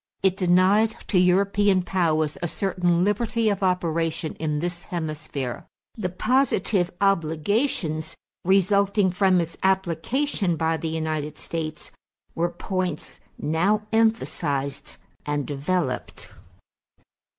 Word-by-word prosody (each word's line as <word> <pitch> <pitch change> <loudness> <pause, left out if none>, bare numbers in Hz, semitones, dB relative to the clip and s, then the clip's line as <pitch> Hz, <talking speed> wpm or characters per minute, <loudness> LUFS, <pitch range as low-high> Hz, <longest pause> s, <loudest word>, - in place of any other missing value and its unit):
It 190 -1 +3
denied 190 +4 +3
to 185 - +4
European 195 +1 +3
powers 160 -5 +1
a 175 - 0
certain 180 -1 +1
liberty 220 +2 +1
of 200 -2 -1
operation 165 -3 0
in 150 -2 -1
this 175 +2 -4
hemisphere. 155 -6 -4 0.3
The 200 -5 -2
positive 195 -3 +1
obligations 165 - 0 0.3
resulting 195 +1 +3
from 185 0 +3
its 170 -1 -3
application 190 - 0
by 160 0 0
the 160 - -3
United 155 -2 -3
States 155 -2 -5 0.4
were 170 +1 0
points 180 -1 -4 0.2
now 185 +8 +1
emphasized 185 -11 0 0.3
and 145 -1 -1
developed. 145 0 -2
180 Hz, 105 wpm, -24 LUFS, 160-195 Hz, 0.4 s, to